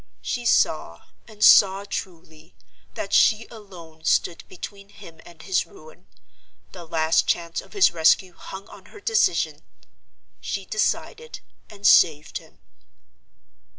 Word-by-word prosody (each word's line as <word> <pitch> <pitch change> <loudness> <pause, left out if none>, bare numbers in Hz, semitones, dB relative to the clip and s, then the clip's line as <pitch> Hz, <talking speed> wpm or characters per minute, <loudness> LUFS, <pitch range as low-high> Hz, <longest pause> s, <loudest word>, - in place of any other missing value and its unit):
She 240 -1 -3
saw, - - +1 0.2
and 215 -2 0
saw 195 0 +6
truly, 160 - -8 0.4
that 195 - -6
she 220 +1 +4
alone 175 -8 -14
stood 170 - 0
between 195 +2 -10
him 165 -5 -15
and 170 -2 -15
his 190 -2 -1
ruin. 470 +5 -17 0.6
The 175 -2 -11
last 160 0 +1
chance 170 -1 -2
of - - -18
his 400 -3 +4
rescue 170 +2 +2
hung 190 +3 -11
on - - -15
her 420 - -14
decision. 460 +3 0 0.8
She 195 -2 -5
decided; 460 - -3 0.3
and 205 -1 -12
saved 150 -3 +4
him. - - -21
190 Hz, 125 wpm, -23 LUFS, 165-215 Hz, 0.8 s, saw